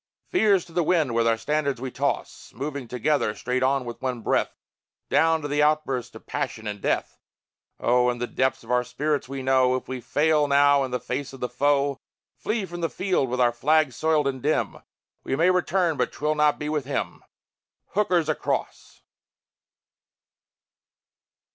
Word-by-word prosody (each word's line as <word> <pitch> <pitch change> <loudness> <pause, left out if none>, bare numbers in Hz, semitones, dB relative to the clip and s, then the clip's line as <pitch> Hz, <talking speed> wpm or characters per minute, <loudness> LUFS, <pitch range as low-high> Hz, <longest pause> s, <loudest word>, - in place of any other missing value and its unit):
Fears 205 - +3
to 170 - -17
the 175 - +2
wind, 160 -6 +1
with 115 0 +2
our 115 0 +3
standards, 140 +1 -1
we 130 0 -5
toss, - - -3
Moving 140 0 -5
together, 125 -2 0
straight 125 +4 -2
on, 135 0 +1
with 120 -1 -7
one 130 -3 -2
breath, - - 0 0.5
Down 160 0 +3
to - - -2
the 145 +1 +1
outburst 150 -5 0
of - - -12
passion 110 - -4
and 105 -1 -5
death. - - -1 0.6
Oh, 125 +1 +3
in 120 - -2
the 120 - -2
depths 130 +1 -1
of - - -8
our 125 0 +3
spirits 150 +1 -2
we 135 -1 -5
know 130 -1 +3
If 130 - -5
we 130 -1 -5
fail 150 +3 +2
now 140 0 +4
in 130 - -3
the 125 0 -2
face 135 +3 -4
of 135 - -10
the 125 - -2
foe, 140 -1 +1 0.4
Flee 215 -2 -2
from 175 -1 -7
the 165 - 0
field 185 -9 0
with 125 +1 -2
our 120 -1 +4
flag 150 +3 +2
soiled 155 +1 +1
and 130 -2 -3
dim, 150 +4 0 0.5
We - - -1
may 170 +5 +4
return, 180 -3 +1
but - - 0
'twill 150 +1 -1
not 150 -1 +2
be 150 - -4
with 150 -3 -1
him! 140 - -3 0.7
Hooker's 180 -5 +1
across! 155 - -3
140 Hz, 180 wpm, -25 LUFS, 125-155 Hz, 0.7 s, now